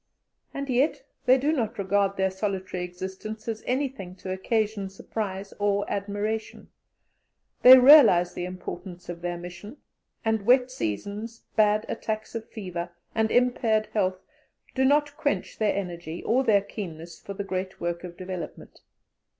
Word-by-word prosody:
And 280 Hz, 0 st, -4 dB
yet 265 Hz, +4 st, +1 dB, 0.2 s
they 255 Hz, +1 st, +7 dB
do 285 Hz, +4 st, +1 dB
not 235 Hz, -5 st, -1 dB
regard 200 Hz, 0 st, +1 dB
their 190 Hz, 0 st, +1 dB
solitary 190 Hz, -2 st, -3 dB
existence 190 Hz, +5 st, -7 dB
as 220 Hz, -1 st, -3 dB
anything 250 Hz, -8 st, -2 dB
to 185 Hz, 0 st, -7 dB
occasion 205 Hz, +1 st, -1 dB
surprise 195 Hz, 0 st, -5 dB
or 205 Hz, 0 st, +1 dB
admiration; 205 Hz, +2 st, -3 dB, 0.9 s
they 255 Hz, +1 st, +11 dB
realize 250 Hz, -, +8 dB
the 175 Hz, -, -4 dB
importance 180 Hz, 0 st, -8 dB
of 170 Hz, -1 st, -6 dB
their 175 Hz, 0 st, -3 dB
mission, 180 Hz, -, -9 dB, 0.5 s
and 220 Hz, -2 st, +1 dB
wet 250 Hz, 0 st, +5 dB
seasons, 205 Hz, -, -4 dB
bad 215 Hz, 0 st, +3 dB
attacks 215 Hz, 0 st, -4 dB
of 230 Hz, -1 st, -6 dB
fever, 180 Hz, -5 st, -5 dB, 0.2 s
and 220 Hz, 0 st, +1 dB
impaired 225 Hz, -3 st, +2 dB
health, 185 Hz, -3 st, +1 dB, 0.6 s
do 265 Hz, 0 st, +2 dB
not 290 Hz, +1 st, +3 dB
quench 300 Hz, -2 st, -2 dB
their 215 Hz, -2 st, +2 dB
energy 170 Hz, -4 st, -5 dB
or 255 Hz, +4 st, +2 dB
their 210 Hz, -5 st, +4 dB
keenness 170 Hz, -5 st, -8 dB
for 200 Hz, -, -8 dB
the 200 Hz, -, -3 dB
great 190 Hz, 0 st, -4 dB
work 170 Hz, 0 st, -3 dB
of 175 Hz, -1 st, -8 dB
development. 185 Hz, -2 st, -7 dB
205 Hz, 145 wpm, -26 LUFS, 185-230 Hz, 0.9 s, they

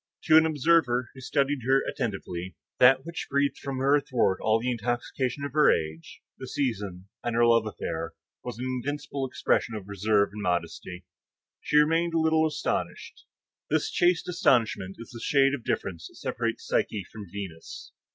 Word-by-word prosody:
To 155 Hz, -, +5 dB
an 160 Hz, 0 st, +7 dB
observer 145 Hz, -5 st, +2 dB
who 130 Hz, -, -12 dB
studied 140 Hz, +2 st, 0 dB
her 135 Hz, 0 st, +4 dB
attentively, 95 Hz, -5 st, -4 dB, 0.2 s
that 130 Hz, +2 st, +6 dB
which 170 Hz, 0 st, -5 dB
breathed 140 Hz, 0 st, +1 dB
from 135 Hz, -2 st, -4 dB
her 135 Hz, +2 st, +2 dB
athwart 130 Hz, -, +1 dB
all 110 Hz, +1 st, +3 dB
the 125 Hz, +2 st, -1 dB
intoxication 120 Hz, +3 st, -2 dB
of 140 Hz, -, -6 dB
her 150 Hz, 0 st, +6 dB
age, 80 Hz, +1 st, -4 dB, 0.2 s
the 130 Hz, -, -7 dB
season, 105 Hz, -9 st, -3 dB, 0.2 s
and 120 Hz, -1 st, -2 dB
her 120 Hz, 0 st, +4 dB
love 115 Hz, -2 st, +4 dB
affair, 110 Hz, -, -5 dB, 0.3 s
was 120 Hz, -3 st, -6 dB
an 125 Hz, -, -4 dB
invincible 135 Hz, +2 st, -3 dB
expression 130 Hz, -3 st, 0 dB
of 100 Hz, -3 st, -7 dB
reserve 100 Hz, +1 st, +2 dB
and 105 Hz, +1 st, -7 dB
modesty. 90 Hz, 0 st, -3 dB, 0.5 s
She -, -, +1 dB
remained 165 Hz, +3 st, +3 dB
a -, -, +3 dB
little 160 Hz, 0 st, +3 dB
astonished. 150 Hz, -1 st, -4 dB, 0.4 s
This -, -, 0 dB
chaste 175 Hz, -1 st, +2 dB
astonishment 115 Hz, -, +1 dB
is 115 Hz, -, -11 dB
the 115 Hz, -2 st, -9 dB
shade 135 Hz, -1 st, +3 dB
of 135 Hz, -5 st, -4 dB
difference 85 Hz, -6 st, -3 dB
which -, -, -18 dB
separates -, -, -3 dB
Psyche 105 Hz, -3 st, 0 dB
from 105 Hz, -2 st, -9 dB
Venus. 95 Hz, -5 st, -8 dB
125 Hz, 170 wpm, -27 LUFS, 105-145 Hz, 0.5 s, an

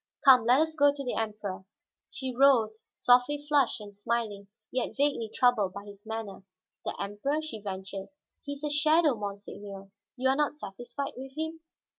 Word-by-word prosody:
Come, 255 Hz, -4 st, +8 dB
let 250 Hz, +3 st, +6 dB
us 320 Hz, 0 st, +2 dB
go 285 Hz, -2 st, +5 dB
to 280 Hz, -1 st, -6 dB
the 250 Hz, -, -2 dB
Emperor." 210 Hz, -4 st, -3 dB, 0.5 s
She 260 Hz, -2 st, -4 dB
rose, 235 Hz, -5 st, +4 dB
softly 250 Hz, +4 st, +4 dB
flushed 285 Hz, -6 st, +3 dB
and 205 Hz, -1 st, -10 dB
smiling, 205 Hz, -2 st, -2 dB, 0.2 s
yet 255 Hz, +1 st, -2 dB
vaguely 275 Hz, -6 st, +1 dB
troubled 220 Hz, -7 st, +3 dB
by 200 Hz, 0 st, -8 dB
his 205 Hz, +1 st, -13 dB
manner. 220 Hz, -4 st, -5 dB, 0.4 s
"The -, -, -4 dB
Emperor?" 205 Hz, +10 st, -1 dB
she 265 Hz, -9 st, -6 dB
ventured. 195 Hz, -1 st, -5 dB, 0.3 s
"He 285 Hz, -, -5 dB
is 285 Hz, +1 st, -11 dB
a 300 Hz, -, 0 dB
shadow, 305 Hz, +1 st, +4 dB
monseigneur! 200 Hz, -2 st, -7 dB, 0.3 s
You 260 Hz, +1 st, +2 dB
are 265 Hz, -, +4 dB
not 295 Hz, +1 st, +1 dB
satisfied 240 Hz, +2 st, -6 dB
with 265 Hz, +1 st, -8 dB
him?" 320 Hz, +1 st, -3 dB
240 Hz, 170 wpm, -29 LUFS, 205-280 Hz, 0.5 s, Come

